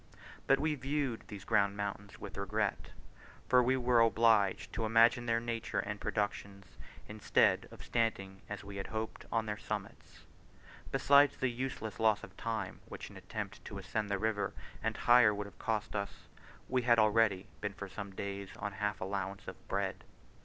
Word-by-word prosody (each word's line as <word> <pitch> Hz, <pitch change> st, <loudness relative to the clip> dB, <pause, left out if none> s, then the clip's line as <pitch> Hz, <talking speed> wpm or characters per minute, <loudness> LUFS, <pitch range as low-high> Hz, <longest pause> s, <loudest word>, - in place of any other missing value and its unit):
But 135 Hz, -, +5 dB
we 155 Hz, +1 st, +1 dB
viewed 135 Hz, -3 st, -2 dB
these 100 Hz, -4 st, -8 dB
grand 100 Hz, -2 st, +2 dB
mountains 100 Hz, 0 st, -4 dB
with -, -, -8 dB
regret, 100 Hz, +1 st, -1 dB, 0.6 s
for 125 Hz, -1 st, +6 dB
we 130 Hz, +2 st, +2 dB
were 125 Hz, -1 st, +3 dB
obliged 115 Hz, -3 st, +3 dB
to 110 Hz, -, -2 dB
imagine 115 Hz, +2 st, +4 dB
their 115 Hz, 0 st, +2 dB
nature 115 Hz, -1 st, -3 dB
and 105 Hz, 0 st, -2 dB
productions, 100 Hz, -2 st, -2 dB, 0.4 s
instead 105 Hz, 0 st, +2 dB
of -, -, -12 dB
standing, 95 Hz, -5 st, -1 dB
as 105 Hz, -1 st, -5 dB
we 100 Hz, 0 st, -8 dB
had 95 Hz, -, -4 dB
hoped, 110 Hz, 0 st, -4 dB
on 115 Hz, -1 st, +1 dB
their 105 Hz, -1 st, -3 dB
summits. -, -, -6 dB, 0.7 s
Besides 145 Hz, 0 st, +5 dB
the 130 Hz, -, +1 dB
useless 120 Hz, -4 st, -4 dB
loss 110 Hz, -2 st, +3 dB
of 95 Hz, -, -11 dB
time 110 Hz, -4 st, -3 dB
which -, -, -8 dB
an -, -, -13 dB
attempt -, -, -6 dB
to -, -, -6 dB
ascend 105 Hz, -2 st, -3 dB
the 100 Hz, -, +1 dB
river 110 Hz, 0 st, -1 dB, 0.3 s
and -, -, -1 dB
higher 120 Hz, -3 st, +6 dB
would 105 Hz, 0 st, -3 dB
have 100 Hz, -, -13 dB
cost 110 Hz, -2 st, -2 dB
us, 100 Hz, -1 st, -4 dB, 0.4 s
we 130 Hz, 0 st, +1 dB
had 120 Hz, -1 st, +4 dB
already 110 Hz, -3 st, +3 dB, 0.2 s
been -, -, -2 dB
for 100 Hz, 0 st, -7 dB
some 100 Hz, +1 st, -6 dB
days 100 Hz, 0 st, -5 dB
on 100 Hz, 0 st, -3 dB
half 105 Hz, 0 st, -2 dB
allowance 95 Hz, +1 st, -3 dB
of -, -, -5 dB
bread. -, -, -2 dB
110 Hz, 175 wpm, -33 LUFS, 100-115 Hz, 0.7 s, for